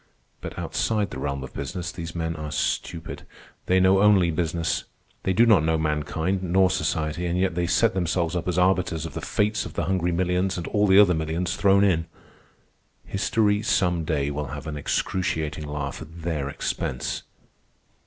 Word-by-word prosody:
But, - - -7
outside 105 -3 -1
the - - -6
realm 70 -1 -3
of 65 - -9
business, 85 +5 -4
these 85 -1 -7
men 80 -1 -2
are 75 -1 -6
stupid. 80 +2 -3 0.5
They 95 +1 +4
know 95 +1 +4
only 100 -5 +5
business. 85 0 -1 0.4
They 95 - 0
do 115 +6 +5
not 110 -9 +5
know 80 0 +2
mankind 80 +4 -1
nor 95 +1 +3
society, 80 0 -1
and 85 +1 -1
yet 95 -1 +1
they 85 0 -1
set 105 +6 +3
themselves 85 -1 0
up 90 - -2
as 90 -1 -1
arbiters 90 -3 +2
of 80 - -7
the - - -5
fates 105 0 0
of - - -8
the - - -1
hungry 90 0 0
millions 90 +2 0
and 85 - -4
all 105 0 +2
the 95 0 +6
other 100 -3 +7
millions 80 +3 -2
thrown 100 0 +4
in. 85 -4 +2 1.0
History, 105 +2 +1
some 90 -6 +1
day, 70 -3 -1
will 75 0 -3
have 75 0 -7
an 80 -1 -4
excruciating 80 0 -2
laugh 75 0 -4
at 80 +1 -10
their 75 -5 -2
expense." 65 -2 -3
85 Hz, 180 wpm, -25 LUFS, 80-95 Hz, 1.0 s, other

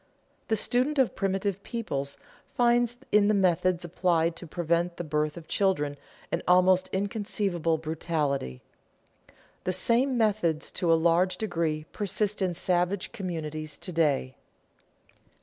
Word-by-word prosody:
The 220 - +2
student 250 +7 +1
of 265 -3 +2
primitive 195 0 -1
peoples 140 - -4 0.4
finds 240 0 +3
in 210 -1 +5
the 215 - +3
methods 185 -2 +2
applied 170 -1 +1
to 175 - -9
prevent 170 +1 -1
the - - -3
birth 150 0 -1
of 165 -2 -10
children 165 -8 +1 0.4
an - - 0
almost 185 +1 +4
inconceivable 195 -4 -1
brutality. 150 - -2 1.0
The 185 - -1
same 240 +7 +2
methods 200 -8 +1
to 170 -2 0
a - - +7
large 175 +3 +2
degree 165 -7 -1
persist 205 0 -2
in 180 -2 0
savage 180 +2 0
communities 155 -7 -5
to 180 - -5
day. 145 -6 +1
180 Hz, 130 wpm, -28 LUFS, 160-205 Hz, 1.0 s, a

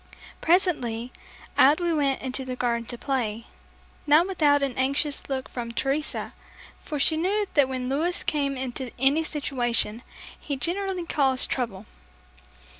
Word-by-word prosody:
Presently, 255 - +1 0.5
out 285 +5 +6
we 345 -1 0
went 280 -4 0
into 260 0 -2
the 255 -1 -5
garden 235 -2 -1
to 240 - -6
play, 235 -4 -2 0.6
not 305 +4 +6
without 295 -7 +3
an 270 -3 -1
anxious 280 +3 0
look 265 -1 -2
from 235 -2 -5
Teresa, 275 +5 -2 0.5
for 300 - -4
she 315 +3 +4
knew 395 +6 +1
that 285 -3 +4
when 255 -1 -3
Louis 315 +7 0
came 280 -2 -1
into 255 0 -4
any 275 +5 +3
situation, 245 -7 -1 0.4
he 285 -2 -4
generally 370 +3 -1
caused 270 -5 +2
trouble. 220 -6 -3
275 Hz, 140 wpm, -26 LUFS, 250-310 Hz, 0.6 s, out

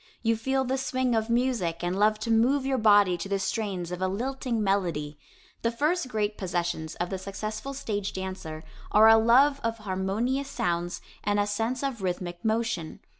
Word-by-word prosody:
You 230 0 +3
feel 265 +4 0
the 265 +1 -1
swing 255 -1 0
of 220 0 0
music 235 -9 0
and 175 +1 0
love 215 +1 +4
to 230 - -1
move 255 +5 +3
your 270 -1 +1
body 205 -5 +5
to 195 - -5
the 200 - +1
strains 190 -3 -2
of 180 +1 -5
a 185 - +2
lilting 240 +2 -2
melody. 170 -7 -1 0.4
The 230 - +1
first 295 +6 0
great 210 -3 -2
possessions 175 -3 -2
of 175 +2 -3
the 190 - -3
successful 215 +8 -5
stage 205 -6 -3
dancer 185 -5 -6 0.3
are 215 +1 +7
a 225 - +9
love 260 +6 +5
of 230 0 -1
harmonious 215 +7 -1
sounds 175 -7 -2 0.2
and 205 0 +1
a 205 - +3
sense 225 +5 -2
of 265 -6 -2
rhythmic 175 -1 -3
motion. 220 -7 -1
215 Hz, 180 wpm, -27 LUFS, 185-240 Hz, 0.4 s, a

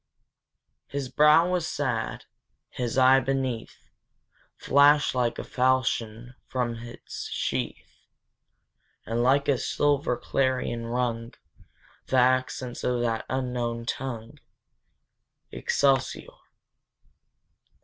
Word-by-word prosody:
His 140 -2 -4
brow 150 +4 +5
was 180 -3 -1
sad; 125 -6 -2 0.5
his 125 0 -3
eye 130 +1 +6
beneath, 130 -3 -3 0.7
Flashed 145 +1 +4
like 125 -2 0
a - - -4
falchion 125 -2 0
from 125 -2 -1
its 120 +1 -8
sheath, - - -4 1.0
And 115 +1 -1
like 135 +3 +3
a 135 -3 +2
silver 145 -4 +1
clarion 125 -3 -1
rung 120 -1 -2 0.7
The 130 - +1
accents 130 0 +1
of 125 -1 0
that 115 -2 -1
unknown 120 -3 -2
tongue, 120 -3 -5 1.1
Excelsior! 135 -2 0
125 Hz, 90 wpm, -26 LUFS, 120-135 Hz, 1.1 s, eye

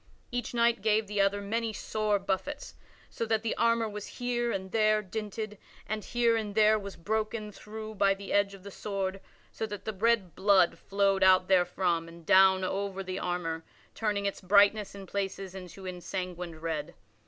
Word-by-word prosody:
Each 245 -2 -2
knight 235 -2 +2
gave 215 +1 +2
the 205 0 0
other 200 +1 +1
many 225 +2 -1
sore 215 -1 0
buffets 200 - -3 0.4
so - - -3
that 220 0 +1
the 230 - 0
armor 230 -1 +2
was 210 -1 -6
here 240 -1 0
and 190 -2 -4
there 215 -1 +3
dinted 210 +1 -5 0.3
and 215 -1 -3
here 235 -1 +2
and 210 -2 -3
there 215 0 +5
was 200 -2 -7
broken 215 +4 -2
through 215 +2 -8
by 200 -1 +3
the 195 0 -6
edge 200 -1 +2
of 190 - -15
the 200 - -8
sword 195 -1 -3 0.3
so 220 - -3
that 205 -2 -7
the 220 - -2
red 210 -3 +1
blood 195 -3 +4
flowed 195 -1 +1
out 185 -1 +6
therefrom 180 -2 +2
and 165 0 -13
down 190 +1 +6
over 195 +1 -2
the 185 0 -4
armor, 165 -2 -2 0.3
turning 205 -2 -1
its 200 - -2
brightness 200 +2 +4
in 195 -1 -8
places 195 0 -4
into 190 0 -9
an 185 -1 -5
ensanguined 180 -3 -5
red. 155 -3 -3
200 Hz, 180 wpm, -29 LUFS, 190-215 Hz, 0.4 s, out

